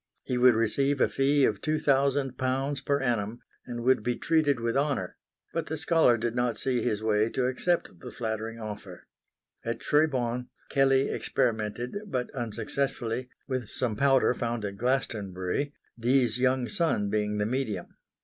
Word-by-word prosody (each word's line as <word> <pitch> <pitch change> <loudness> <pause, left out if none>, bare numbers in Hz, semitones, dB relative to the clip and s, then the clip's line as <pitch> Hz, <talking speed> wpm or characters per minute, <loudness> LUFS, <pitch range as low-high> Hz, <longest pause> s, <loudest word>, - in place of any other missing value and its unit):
He 125 - -2
would 125 -1 +6
receive 135 +5 +1
a - - +5
fee 140 0 +3
of 105 -2 0
two 155 0 0
thousand 135 -2 +2
pounds 135 +2 -1
per 140 +1 +1
annum 115 -2 -1 0.3
and 120 -1 -5
would 130 -1 +4
be 120 +2 -1
treated 155 -4 +2
with 115 0 -1
honour; 135 -10 0 0.4
but 165 - -2
the 160 - -3
scholar 160 -6 +4
did 115 0 -2
not 120 -2 0
see 125 -3 0
his 110 -2 -1
way 110 0 +2
to 130 - 0
accept 130 - 0
the - - -8
flattering 110 0 -4
offer. 105 -4 -8 0.6
At 115 0 -3
Tribau, 125 -5 +1 0.2
Kelley 135 0 +3
experimented, 115 - -1
but 130 -8 -3
unsuccessfully, 120 +1 -2 0.2
with 130 -5 -3
some 120 -4 -1
powder 135 +1 +4
found 120 -3 -2
at 100 -1 -4
Glastonbury, 110 -1 -1 0.3
Dee's 125 -1 +2
young 130 -1 +2
son 105 -5 0
being 105 0 0
the 105 - +1
medium. 125 -2 -2
125 Hz, 160 wpm, -28 LUFS, 110-135 Hz, 0.6 s, would